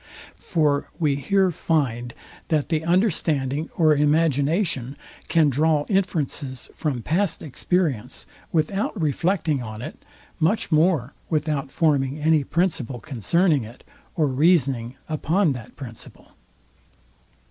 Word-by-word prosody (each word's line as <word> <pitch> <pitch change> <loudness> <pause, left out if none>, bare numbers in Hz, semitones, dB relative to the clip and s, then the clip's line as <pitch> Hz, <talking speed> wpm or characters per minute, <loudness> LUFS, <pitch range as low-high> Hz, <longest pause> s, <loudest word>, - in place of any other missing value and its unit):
For 150 -4 0
we 150 -4 +1
here 190 +5 +2
find, 125 -8 -1 0.3
that 155 -3 0
the 160 -2 0
understanding 160 - +1
or 155 -3 +5
imagination 145 - +1 0.3
can 160 -3 +3
draw 150 +2 +2
inferences 155 -8 -2
from 135 -7 -3
past 170 - 0
experience, 155 - -2 0.3
without 195 +6 -1
reflecting 160 -1 0
on 110 -1 -7
it; 155 - -9 0.4
much 175 +5 +1
more 155 -5 +2 0.2
without 150 -3 -1
forming 140 -3 +1
any 155 -1 +2
principle 140 -7 -1
concerning 155 - +1
it, 115 +3 -12 0.3
or 155 - +2
reasoning 135 -4 +2
upon 160 +2 +1
that 120 -3 -10
principle. 120 -5 -11
150 Hz, 110 wpm, -23 LUFS, 135-165 Hz, 0.4 s, or